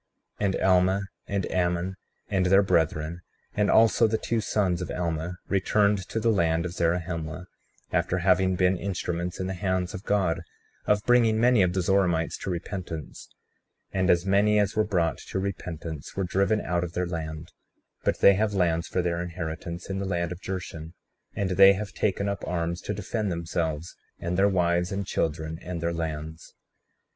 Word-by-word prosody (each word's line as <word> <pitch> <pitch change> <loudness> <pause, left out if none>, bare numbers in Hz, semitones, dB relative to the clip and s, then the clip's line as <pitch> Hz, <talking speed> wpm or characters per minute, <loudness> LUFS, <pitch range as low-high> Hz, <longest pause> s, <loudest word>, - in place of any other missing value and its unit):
35:14 105 - +1
And 95 - 0
Alma, 95 +1 +4 0.3
and 100 -2 -2
Ammon, 90 +1 0 0.3
and 95 -3 +1
their 95 +2 +6
brethren, 85 -2 0 0.3
and 105 0 +1
also 115 +1 +5
the 110 0 0
two 115 0 -1
sons 95 -5 0
of 90 - -4
Alma 85 0 -3
returned 100 0 +2
to 115 - -1
the 115 +1 +2
land 85 -4 +1
of 90 - -4
Zarahemla, 85 0 -2 0.5
after 90 +1 +1
having 95 +1 +3
been 90 +1 +2
instruments 90 -2 -3
in 95 - -2
the 95 - -2
hands 95 -1 -1
of 95 - -6
God 95 -6 +1 0.5
of 105 0 +2
bringing 115 -3 +4
many 120 -2 +5
of 90 -1 +2
the 95 -1 0
Zoramites 85 -3 +2
to - - -5
repentance; 85 -4 -6 0.6
and 95 0 +1
as 85 +1 +4
many 100 +2 +3
as 105 -1 +1
were 110 - +3
brought 90 -6 0
to - - -3
repentance 85 -5 -5
were 95 - -1
driven 100 +4 +1
out 85 -1 -1
of 85 -1 -5
their 90 +1 -1
land; 80 -2 -5 0.5
but - - 0
they 100 - +8
have 105 +1 0
lands 85 -3 +1
for 90 - -1
their 85 0 -1
inheritance 85 0 -5
in 95 0 -3
the 100 - -3
land 85 -2 -1
of 90 - -7
Jershon, 80 -4 -6 0.4
and 95 -2 -1
they 95 +1 +8
have 100 0 -5
taken 100 -1 0
up 100 0 -3
arms 85 0 -2
to 105 - -3
defend 105 +1 -2
themselves, 85 -1 -3 0.2
and 85 +1 -3
their 100 +2 +4
wives, 90 -1 +1
and 100 0 -2
children, 80 -2 -2
and 90 -1 -5
their 85 +1 -1
lands. 80 -1 -5
90 Hz, 180 wpm, -26 LUFS, 85-100 Hz, 0.6 s, they